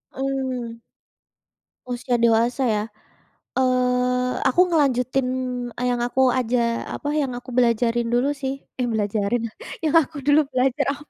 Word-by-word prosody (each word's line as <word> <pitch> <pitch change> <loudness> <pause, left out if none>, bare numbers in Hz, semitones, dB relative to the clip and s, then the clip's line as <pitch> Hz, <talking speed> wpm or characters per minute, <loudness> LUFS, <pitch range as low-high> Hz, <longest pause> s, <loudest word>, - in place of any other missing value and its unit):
Mmm. 260 -3 -3 1.1
Usia 245 0 -1
dewasa 235 +3 +2
ya? 210 -2 +1 0.7
Eee, 250 0 +1
aku 360 +8 +4
ngelanjutin 265 -5 +1 0.5
yang 245 -1 0
aku 260 +1 +2
aja 235 -1 0
apa, 290 - -5
yang 285 -4 -1
aku 245 +1 -8
belajarin 235 -1 +2
dulu 255 +4 +2
sih. 270 0 -4 0.2
Eh 250 - +1
belajarin, 220 +1 -1 0.3
yang 310 0 +1
aku 290 -1 -7
dulu 290 +2 +4
belajar 260 +2 +1
apa, 295 - -11
250 Hz, 125 wpm, -23 LUFS, 240-270 Hz, 1.1 s, aku